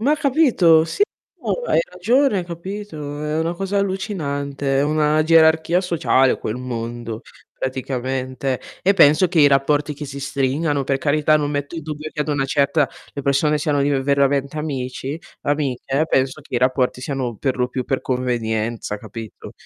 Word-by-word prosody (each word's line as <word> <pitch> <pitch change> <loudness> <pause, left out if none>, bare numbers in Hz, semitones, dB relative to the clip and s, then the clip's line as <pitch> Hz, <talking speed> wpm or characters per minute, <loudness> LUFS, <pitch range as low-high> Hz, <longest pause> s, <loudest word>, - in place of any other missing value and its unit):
Ma 285 +7 +3
capito? 255 - +4
Sì, 165 - -1 0.3
tu - - -14 0.2
hai - - +3
ragione, 250 -6 +2
capito? 170 -4 -6
È 150 +1 -1
una 165 +1 0
cosa 195 +2 -2
allucinante, 145 -9 -2
è - - +3
una 155 0 +2
gerarchia 160 +1 +4
sociale 160 -7 +2
quel 110 - -3
mondo, 120 -2 -5 0.4
praticamente. 130 0 -3 0.2
E 195 +2 +3
penso 155 0 +6
che 170 -2 +2
i 145 - +7
rapporti 145 +2 +1
che 150 +1 -7
si 140 0 -7
stringano, 140 +1 0
per 135 0 0
carità 150 +2 +3
non 145 -1 -1
metto 145 +1 -3
in 165 - -5
dubbio 155 0 -6
che 150 - -5
ad 150 - -1
una 145 -2 0
certa 140 +1 +2 0.2
le 140 - -5
persone 145 +2 +2
siano 145 -2 +1
div 140 -1 +1
veramente 140 +1 +1
amici 140 0 -4 0.2
amiche, 145 0 -1
penso 130 0 +1
che - - -10
i - - +3
rapporti 130 0 +1
siano 130 -3 -3
per 130 +3 -1
lo 125 - +1
più 125 0 -4
per 135 - -1
convenienza, 115 -4 -2
capito? 110 -2 -9
145 Hz, 165 wpm, -21 LUFS, 130-160 Hz, 0.4 s, i